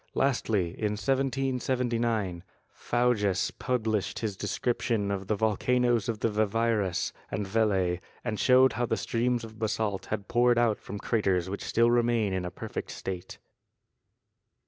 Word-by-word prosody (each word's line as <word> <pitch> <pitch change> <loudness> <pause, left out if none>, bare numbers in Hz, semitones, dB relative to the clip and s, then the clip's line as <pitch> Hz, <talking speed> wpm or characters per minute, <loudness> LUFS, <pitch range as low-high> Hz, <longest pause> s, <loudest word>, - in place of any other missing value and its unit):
Lastly, 110 -9 +1
in 105 +3 -2
1779, 125 -6 0 0.3
Faujas 110 -6 +1
published 110 -6 -1
his 110 -3 -2
description 115 0 -1
of 100 -1 -3
the 110 - +1
volcanoes 115 +2 +1
of 110 -2 -3
the - - +3
Vivarais 110 -2 0 0.2
and 105 - -2
Velay 95 -4 +1 0.2
and 110 -4 -3
showed 130 +1 +5
how 120 +2 -1
the 115 - 0
streams 120 0 0
of 110 -1 -10
basalt 110 -2 -1
had 100 -2 -3
poured 120 0 +3
out 115 -3 +2
from 105 - -7
craters 95 -5 0
which 100 - -4
still 115 +1 +3
remain 120 -4 +2
in 95 -1 -2
a - - -2
perfect - - -6
state. 90 -2 -6
110 Hz, 140 wpm, -28 LUFS, 100-120 Hz, 0.3 s, showed